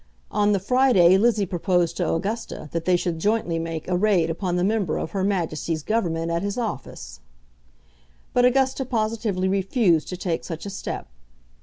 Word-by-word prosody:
On 205 0 +2
the 200 - +2
Friday 205 -5 +4
Lizzie 215 0 +3
proposed 175 -1 0
to - - 0
Augusta 195 -3 -3
that 165 -1 -3
they 185 - +4
should 175 -2 -2
jointly 205 -4 0
make 165 -1 -5
a 180 - 0
raid 180 -4 +2
upon 175 +1 -2
the 180 - +1
member 200 -4 0
of - - -4
Her 195 -2 -1
Majesty's 165 -5 -1
Government 170 -6 -1
at 170 0 0
his 200 +3 -3
office; 130 - -5 1.1
but 245 - +3
Augusta 265 +1 +2
positively 215 -5 -1
refused 190 - +2
to 180 - -5
take 175 -2 -2
such 165 0 -6
a 200 - -5
step. 195 - -5
190 Hz, 170 wpm, -24 LUFS, 170-215 Hz, 1.1 s, Friday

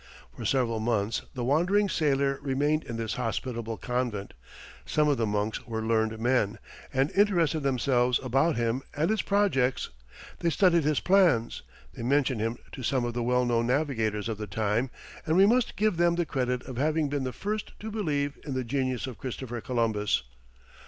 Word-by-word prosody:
For - - -7
several 120 -4 +1
months 110 -1 0
the 125 - -3
wandering 175 +10 +3
sailor 140 -5 +1
remained 145 +3 0
in 115 - -5
this 115 -1 -2
hospitable 115 0 -3
convent; 120 -2 -3 0.5
some 150 0 +1
of 145 -2 +2
the 115 - 0
monks 105 +3 -2
were 110 -1 -3
learned 110 0 +1
men, 115 -2 +1 0.3
and 135 +2 +1
interested 175 -6 +3
themselves 125 -2 +2
about 135 +5 +2
him 120 +2 0
and 155 +7 +1
his 220 -2 +1
projects; 185 -11 +1 0.5
they 170 - +1
studied 170 -1 +3
his 150 -1 +2
plans; 180 - +3 0.3
they - - -8
mentioned 130 -1 +1
him 115 +2 -1
to - - -8
some 125 0 0
of 120 - -3
the 120 - -2
well 125 +1 +2
known 115 -1 +1
navigators 115 -6 0
of 110 -2 -4
the 105 - -4
time; 110 +4 0 0.4
and 160 +2 +2
we 195 - +7
must 240 +3 +2
give 210 -4 +2
them 170 0 +3
the 175 0 0
credit 125 -3 -1
of 130 -3 -8
having 155 +2 +1
been 140 -1 -2
the 130 - -2
first 210 +8 -4
to 220 +1 -6
believe 145 -9 -1
in 140 -4 -4
the 130 - -1
genius 130 0 -1
of 130 -4 -8
Christopher 120 -2 -5
Columbus. 110 - 0
130 Hz, 180 wpm, -28 LUFS, 115-155 Hz, 0.5 s, we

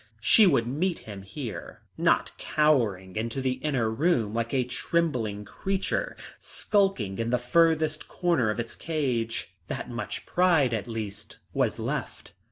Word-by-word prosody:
She 205 - +6
would 115 -10 +3
meet 160 +8 0
him 100 -3 -7
here, 105 - -7
not - - +2
cowering 115 -12 +1
into 115 +4 -2
the 130 -1 -1
inner 135 -7 +1
room 115 -2 +1
like 115 0 -1
a 130 -2 +2
trembling 125 -6 -1
creature 195 - -2 0.2
skulking 190 - 0
in 115 0 0
the 125 - +3
furthest 155 +4 +2
corner 170 -11 +1
of 105 - -2
its 115 -1 -4
cage. 120 - -2
That - - -5
much 120 0 -5
pride 170 -9 +3
at 110 -1 -2
least 105 -3 -6 0.2
was - - +1
left. - - -4
125 Hz, 145 wpm, -27 LUFS, 110-155 Hz, 0.2 s, She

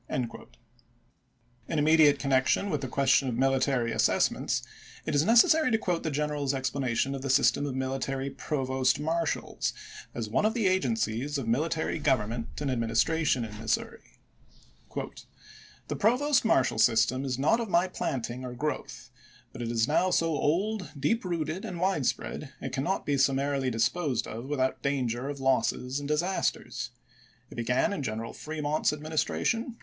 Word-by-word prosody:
pp. 125 - 0
42, - - -12 0.5
«'. 120 0 -39
In 160 - 0
immediate 150 -1 +5
connection 140 +8 +1
with, 150 -3 -1
the 135 - -3
question 135 +1 +2
of 115 - -3
military 135 -2 +1
assessments, - - +1 0.4
it - - -2
is 145 0 +3
necessary 240 - +5
to 225 - +3
quote 180 -6 -1
the 160 - -2
general's 145 -1 -1
explanation 130 -1 -1
of 135 - -5
the 135 - -4
system 140 +2 +3
of 135 - -4
military 135 +1 -2
provost 130 -3 0
marshals, 165 +1 -1 0.4
as 115 -2 -3
one 105 - +1
of 220 +2 +1
the 230 -4 0
agencies 130 -5 0
of 135 - -3
mili 130 +9 +1
tary 160 0 -2
government 120 -5 0
and 145 -2 -1
administration 125 +3 +1
in 105 -1 -9
Missouri: 110 -1 -2 0.9
The - - -9
provost 255 +6 +3
marshal 135 -12 +2
system 120 +3 +3
is 130 -3 -2
not 150 - +3
of 230 -3 -3
my 175 +1 +3
planting 125 -8 -3
or 125 -1 -6
i863. - - -14
growth, 150 +3 -4 0.4
but - - -7
is 115 -1 0
now 170 +5 +2
so 165 -2 +2
old, 180 +6 0
deep 225 - +1
rooted, 170 0 -3
and 175 -2 -5
widespread 150 -5 -1
it 135 - -6
cannot 140 +9 -1
be 140 -2 +1
summarily 135 0 +1
disposed 125 +2 0
of 115 +3 -7
without 130 -2 -1
danger 130 -2 -1
of 145 -1 -5
losses 130 0 +1
and 145 - -5
disasters. 175 +6 -1 0.6
It - - -10
began 125 - +1
in 175 - -3
General 115 -2 -4
Fremont's 155 0 -1
adminis 155 +1 -1
tration. 230 +1 -2
140 Hz, 160 wpm, -28 LUFS, 125-160 Hz, 0.9 s, immediate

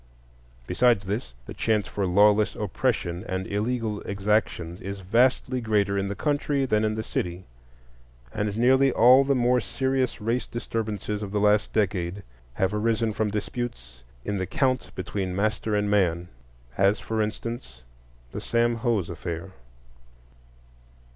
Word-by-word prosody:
Besides 110 - +2
this, 95 - -4
the - - -8
chance 110 -2 +1
for 100 -2 -2
lawless 105 +3 +4
oppression 100 -4 -1
and 95 0 -2
illegal 110 +1 -2
exactions 100 -4 -1
is 100 0 -6
vastly 125 +5 +2
greater 105 -3 +1
in 100 0 0
the 100 - -3
country 145 0 0
than 110 -4 +1
in 110 0 0
the 110 - -3
city, 90 -3 -3 0.9
and 105 0 -2
nearly 130 +3 +4
all 125 +4 +7
the 140 0 +1
more 125 0 +3
serious 130 +3 -1
race 115 +3 -1
disturbances 110 -3 -3
of 105 - -4
the 105 - 0
last 105 0 +3
decade 95 -2 -1 0.3
have 95 +5 0
arisen 110 +1 +1
from 110 0 0
disputes 100 - -5 0.2
in 100 -1 -2
the 95 - -2
county 130 -2 0
between 95 0 -3
master 105 +1 0
and 105 0 +1
man,—as, 85 - 0
for 110 -1 -2
instance, 110 - -5 0.5
the - - -5
Sam 120 0 +1
Hose 115 -6 0
affair. 85 +1 -6
105 Hz, 140 wpm, -26 LUFS, 95-115 Hz, 0.9 s, all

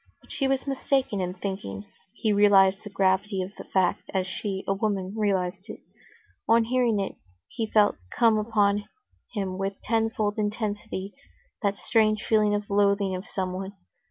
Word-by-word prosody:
But - - -18
she 270 - 0
was 265 0 0
mistaken 270 -6 0
in 180 0 -3
thinking 180 - -5 0.3
he 215 0 0
realized 195 -1 +5
the 205 - -7
gravity 195 0 +1
of 185 - -7
the - - -9
fact 185 -2 0
as 185 -1 +1
she, 190 +1 -4
a 195 - +2
woman, 195 -2 -2
realized 195 -2 -1
it. - - -7 0.7
On 230 0 +6
hearing 235 -2 +1
it, 195 - -3 0.3
he 225 - -3
felt 210 -1 +4 0.2
come 225 -2 +4
upon 205 -2 +1 0.5
him 190 -2 -2
with 195 0 -3
tenfold 220 -2 0
intensity 205 -2 -3 0.5
that 200 -1 0
strange 215 -1 +2
feeling 210 -2 +3
of 205 0 -3
loathing 200 -1 +2
of 185 +3 -7
someone. 190 +1 -4
205 Hz, 155 wpm, -26 LUFS, 190-215 Hz, 0.7 s, On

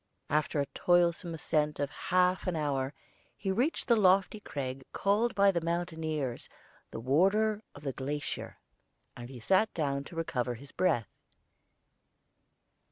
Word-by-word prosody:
After 150 0 +1
a 140 - +2
toilsome 170 +1 +2
ascent 150 -1 0
of 145 0 -1
half 180 +3 +1
an 180 - 0
hour 140 -3 -1 0.4
he 195 -1 -2
reached 250 - 0
the 235 - +5
lofty 195 0 +4
crag 135 -8 -5
called 210 +4 +1
by 200 0 +5
the 170 -3 -1
mountaineers 160 -6 -2 0.4
the - - -6
Warder 195 - +2
of 145 - -12
the 135 -2 -2
Glacier, 145 +3 -4 0.6
and 120 0 -8
sat 195 - +3
down 140 -3 -1
to 170 - -11
recover 125 -7 -1
his 140 +5 -12
breath. 160 -12 0
160 Hz, 135 wpm, -31 LUFS, 140-190 Hz, 0.6 s, the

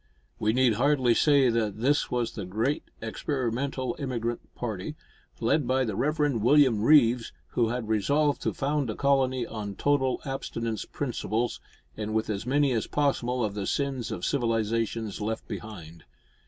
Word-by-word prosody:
We 110 - +2
need 125 0 +3
hardly 130 0 +3
say 140 -1 +4
that 110 -3 -1
this 140 +5 +2
was 120 -2 -1
the 105 - -6
great 110 +10 -1 0.2
experimental 130 +1 -2
emigrant 120 -4 -4
party, 110 +3 -4 0.4
led 150 -5 +1
by 130 0 +2
the 110 -4 -3
Reverend 145 -1 +1
William 130 -3 +5
Reeves, 120 -3 +4 0.2
who 115 -2 +1
had 120 -1 -3
resolved 140 +8 +1
to - - -1
found 145 -2 0
a 110 - -3
colony 130 -3 +2
on 105 -3 -6
total 135 0 +1
abstinence 115 -5 -3
principles, 120 -3 -2 0.4
and 110 +1 -4
with 110 0 0
as 100 +3 -4
many 140 +1 +3
as 115 -3 0
possible 125 -4 0
of 105 - -3
the 100 -1 -3
sins 135 -5 -1
of 110 - -3
civilisation 115 -3 0
left 110 +1 -3
behind. 85 -7 -8
120 Hz, 155 wpm, -27 LUFS, 110-140 Hz, 0.4 s, William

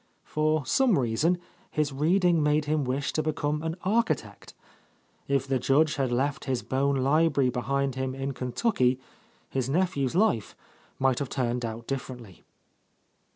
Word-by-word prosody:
For 155 -1 0
some 255 - +3
reason, 135 +8 +1 0.3
his 150 -2 -1
reading 170 +3 +3
made 150 0 +2
him 150 0 0
wish 135 +3 -2
to 155 - +1
be 155 0 -1
come 150 +1 -1
an 160 0 -3
architect. 225 +5 -1 0.7
If 140 -1 +1
the 135 -1 +1
Judge 150 +4 +2
had 135 -3 0
left 140 +4 -1
his 130 -3 -1
Bohn 140 +1 +1
library 140 0 +2
behind 135 +3 -1
him 130 0 -3
in 135 +1 -3
Kentucky, 130 - 0 0.5
his 130 -1 -2
nephew's 150 -4 0
life 175 - +1 0.4
might 130 -1 +2
have 140 -3 -3
turned 125 -1 -1
out 115 0 -5
differently. 125 -9 -6
140 Hz, 150 wpm, -27 LUFS, 130-155 Hz, 0.7 s, some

